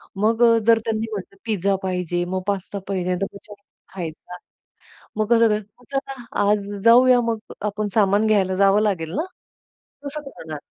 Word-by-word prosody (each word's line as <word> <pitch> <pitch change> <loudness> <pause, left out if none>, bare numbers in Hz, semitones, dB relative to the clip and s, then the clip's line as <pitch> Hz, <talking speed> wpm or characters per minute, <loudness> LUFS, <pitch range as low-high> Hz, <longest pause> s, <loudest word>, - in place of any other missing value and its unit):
मग 220 +4 +2
अ, 230 -1 +6
जर 230 -1 +6
त्यांनी 220 0 -1
म्हटलं, 195 -1 -7
"पिझ्झा 200 -3 +1
पाहिजे 180 -2 -1
मग 185 +1 -3
पास्ता 200 0 -2
पाहिजे," 185 -2 -1
तर - - +2
विचारून 200 0 -14 0.3
खायचा, 175 0 -7 0.8
"मग 215 - +1
कसं 230 0 +5
काय? 210 0 +1 0.3
चला 270 0 -3 0.3
आज 205 -1 +1 0.2
जाऊया 245 +1 +6
मग 225 -1 -1 0.3
आपण 210 +1 -3
सामान 205 0 +3
घ्यायला 195 -3 +2
जावं 195 +2 +4
लागेल 180 -7 -1
ना, 315 - 0 0.8
कसं 290 +2 -5
करणार 155 - -8
205 Hz, 155 wpm, -22 LUFS, 190-225 Hz, 0.8 s, अ